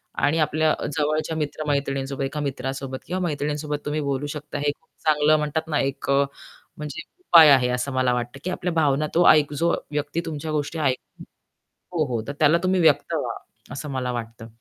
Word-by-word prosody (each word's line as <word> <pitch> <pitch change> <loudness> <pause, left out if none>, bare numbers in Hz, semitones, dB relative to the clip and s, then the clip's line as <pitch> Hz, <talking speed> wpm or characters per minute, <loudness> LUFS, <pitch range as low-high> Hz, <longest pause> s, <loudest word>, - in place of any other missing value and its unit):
आणि 145 +3 +1
आपल्या 155 +1 +2 0.2
जवळच्या 155 +2 0
मित्र-मैत्रिणींसोबत 140 -2 -2
एका 145 +3 -3
मित्रासोबत 135 -1 -4
किंवा 185 +2 -2
मैत्रिणींसोबत 150 -2 -2
तुम्ही 150 +1 -1
बोलू 140 0 -2
शकता, 150 0 -6
हे 145 0 +1
खूप 160 - -38 0.2
चांगलं 155 0 +4
म्हणतात 150 +2 -2
ना, 150 - +1
एक 135 0 -2
अ, 140 0 +4 0.5
म्हणजे 150 -2 -6
एक - - -53
उपाय 160 -3 +9
आहे 130 -2 +5
असं 125 +2 -1
मला 130 -1 +2
वाटतं 120 +2 -4
की 185 - -2
आपल्या 180 -1 -2
भावना 150 -2 +2
तो 175 - +5
एक 150 -1 +3
जो 170 +4 +1 0.2
व्यक्ती 150 +3 -2
तुमच्या 155 -1 -4
गोष्टी 150 +2 -2
ऐकतो 135 -4 -2 0.8
हो, 155 - +3
हो. 110 - -2
तर - - -2
त्याला 155 +3 +5
तुम्ही 185 0 +2
व्यक्त 160 - +3
व्हा - - -2 0.4
असं 145 +3 -6
मला 125 -2 -2
वाटतं. 115 -1 -6
145 Hz, 185 wpm, -24 LUFS, 135-155 Hz, 0.8 s, उपाय